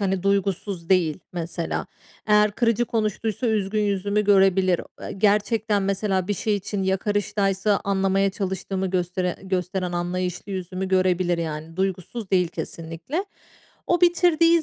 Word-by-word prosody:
hani, 190 -2 0
duygusuz 195 -2 -1
değil 180 -3 +2
mesela. 170 -1 -3 0.4
Eğer 210 0 +5
kırıcı 230 +2 +1
konuştuysa 220 +1 -1
üzgün 215 -1 0
yüzümü 205 +1 0
görebilir. 190 -3 +4 0.2
Eee, - - -6
gerçekten 210 +1 +2
mesela 195 -1 0
bir 205 - +1
şey 210 +1 0
için 200 0 -3
yakarıştaysa 195 +1 +1
anlamaya 195 0 +2
çalıştığımı 190 -1 -3
göstere 180 0 -1
gösteren 185 -1 -2
anlayışlı 180 +2 -3
yüzümü 185 0 -4
görebilir 185 -2 +2
yani. 160 0 -5
Duygusuz 190 +3 -3
değil 180 -3 +3
kesinlikle. 165 - -5 0.6
O 350 - +2
bitirdiği 340 -1 +4
195 Hz, 125 wpm, -24 LUFS, 185-210 Hz, 0.6 s, Eğer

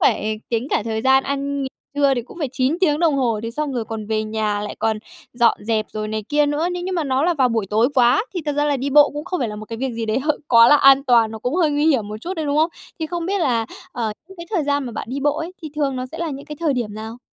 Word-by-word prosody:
phải 215 0 +1
tính 235 +1 -1
cả - - +1
thời 220 -1 -2
gian 265 0 +4
ăn 280 0 -2
nghỉ 265 - -2 0.3
trưa 280 -1 +3
thì 240 - -2
cũng 255 - -13
phải 295 -5 -1
9 265 +5 0
tiếng 300 -5 +3
đồng 330 -3 +3
hồ, 235 -5 +1
thế 230 - -4
xong 295 +3 -3
rồi 240 -3 -2
còn 220 -1 -6
về 215 0 0
nhà 215 -1 -1
lại 210 0 -5
còn 220 -1 0 0.3
dọn 240 -1 +3
dẹp, 215 -1 0
rồi 215 0 -3
này 215 0 -3
kia 295 0 +3
nữa. 300 +4 0
Nếu 355 0 -4
nhưng 370 +1 -3
mà 335 -3 0
nó 265 -1 +1
là 350 -1 +2
vào 260 -4 +3
buổi 225 -4 -1
tối 220 +3 +3
quá 250 - +4
thì 355 - -1
thật 295 - +1
ra 290 +1 +1
là 290 -1 +1
đi 275 +2 -3
bộ 290 +1 +6
cũng 295 +1 -6
không 360 -4 -3
phải 240 - 0
là 210 - -6
một 215 - -7
cái 230 - -5
việc 265 -1 -2
gì 225 -1 -4
đấy 220 +4 +1
h 300 - -5 0.2
quá 230 -1 +7
là 295 - +7
an 275 -1 +6
toàn, 235 -4 +4
nó 220 - -7
cũng 250 +6 -2
hơi 335 -4 +3
nguy 290 +1 +1
hiểm 250 -10 +2
một 210 - -5
chút 370 +2 -4
đấy, 315 -2 -2
đúng 285 - 0
không? 320 +2 +3 0.3
Thì 320 - -1
không 340 +1 -4
biết 395 0 0
là, 235 -7 +1 0.3
ờ, 225 -3 -2 0.2
những 385 - -13
cái 340 -1 -8
thời 345 -9 0
gian 285 -1 0
mà 240 - -6
bạn - - -5
đi 275 +2 -3
bộ 290 +1 +1
ấy, 330 +3 -5
thì 310 - -6
thường 275 -3 0
nó 255 - -3
sẽ 320 - -10
là 335 -1 -2
những 275 0 -7
cái 300 - -7
thời 320 -4 +2
điểm 225 -5 -3
nào? 220 +2 -7
270 Hz, 320 wpm, -21 LUFS, 225-300 Hz, 0.3 s, quá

